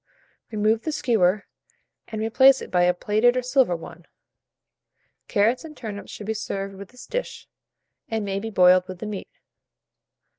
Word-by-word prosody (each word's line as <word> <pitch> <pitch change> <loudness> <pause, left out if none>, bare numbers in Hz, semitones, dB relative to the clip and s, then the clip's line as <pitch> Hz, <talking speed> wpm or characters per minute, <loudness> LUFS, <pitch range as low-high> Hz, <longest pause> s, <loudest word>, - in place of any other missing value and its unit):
Remove 215 +1 +1
the 315 - -3
skewer, 215 - +1 0.6
and 220 -1 -4
replace 260 +4 +5
it - - -9
by 180 -1 +3
a 180 - +3
plated 215 +7 +2
or 255 - 0
silver 250 -7 +2
one. 165 +1 -11 1.2
Carrots 225 +7 +2
and 310 -2 -11
turnips 210 -4 -7
should 210 - -8
be 220 - -1
served 195 -2 -4
with 195 0 -10
this 250 0 -13
dish, - - -5 0.6
and 220 -2 -2
may 195 0 -2
be 225 +2 -5
boiled 185 -2 +5
with 185 -1 -7
the 200 - -7
meat. 210 -2 -6
215 Hz, 160 wpm, -24 LUFS, 195-240 Hz, 1.2 s, replace